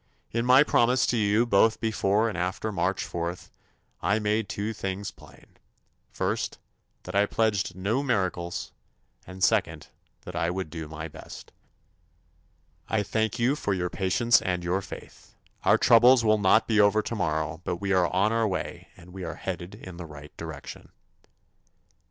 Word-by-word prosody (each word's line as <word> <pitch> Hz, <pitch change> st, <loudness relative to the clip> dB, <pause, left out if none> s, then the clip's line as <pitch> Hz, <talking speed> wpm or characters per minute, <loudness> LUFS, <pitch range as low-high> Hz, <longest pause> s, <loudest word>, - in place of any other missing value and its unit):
In 115 Hz, +2 st, -1 dB
my 130 Hz, +3 st, +7 dB
promises 125 Hz, -3 st, +3 dB
to 120 Hz, -, +1 dB
you 105 Hz, +2 st, +3 dB
both 110 Hz, 0 st, +3 dB
before 110 Hz, -1 st, +1 dB
and 110 Hz, -, -3 dB
after 95 Hz, +5 st, -2 dB
March 95 Hz, -2 st, -1 dB
4th, 85 Hz, +1 st, -5 dB, 0.5 s
I 100 Hz, +2 st, +2 dB
made 105 Hz, 0 st, 0 dB
two 105 Hz, +2 st, -3 dB
things 95 Hz, -1 st, -4 dB
plain: -, -, -19 dB, 0.5 s
First, -, -, -2 dB, 0.5 s
that 90 Hz, -, -8 dB
I 100 Hz, +1 st, +3 dB
pledged 100 Hz, -5 st, 0 dB
no 100 Hz, +8 st, 0 dB
miracles 95 Hz, -9 st, -2 dB, 0.6 s
and, 95 Hz, 0 st, -6 dB
second, -, -, +1 dB, 0.3 s
that -, -, -9 dB
I 85 Hz, +1 st, 0 dB
would 90 Hz, -3 st, -4 dB
do 80 Hz, -2 st, -6 dB
my 80 Hz, +1 st, -6 dB
best. 75 Hz, -, -11 dB, 1.4 s
I 110 Hz, -2 st, 0 dB
thank 110 Hz, +2 st, -1 dB
you 125 Hz, +4 st, +2 dB
for 105 Hz, -9 st, -1 dB
your 90 Hz, -1 st, -2 dB
patience 115 Hz, +5 st, +3 dB
and 90 Hz, -1 st, -2 dB
your 90 Hz, +3 st, 0 dB
faith. -, -, -12 dB, 0.3 s
Our -, -, +6 dB
troubles 120 Hz, +1 st, +6 dB
will 110 Hz, 0 st, +4 dB
not 105 Hz, +3 st, +4 dB
be 110 Hz, -2 st, +2 dB
over 105 Hz, +1 st, +4 dB
tomorrow, 80 Hz, -6 st, -2 dB
but 90 Hz, -, -2 dB
we 100 Hz, +2 st, -2 dB
are 90 Hz, -2 st, +2 dB
on 100 Hz, +4 st, +2 dB
our 115 Hz, -1 st, +2 dB
way 95 Hz, -3 st, -4 dB
and 90 Hz, +1 st, -15 dB
we 95 Hz, -1 st, -7 dB
are 85 Hz, -1 st, -5 dB
headed 90 Hz, -1 st, -6 dB
in 90 Hz, -2 st, -10 dB
the 85 Hz, -2 st, -7 dB
right 75 Hz, -1 st, -12 dB
direction. 80 Hz, -3 st, -8 dB
100 Hz, 165 wpm, -27 LUFS, 90-110 Hz, 1.4 s, my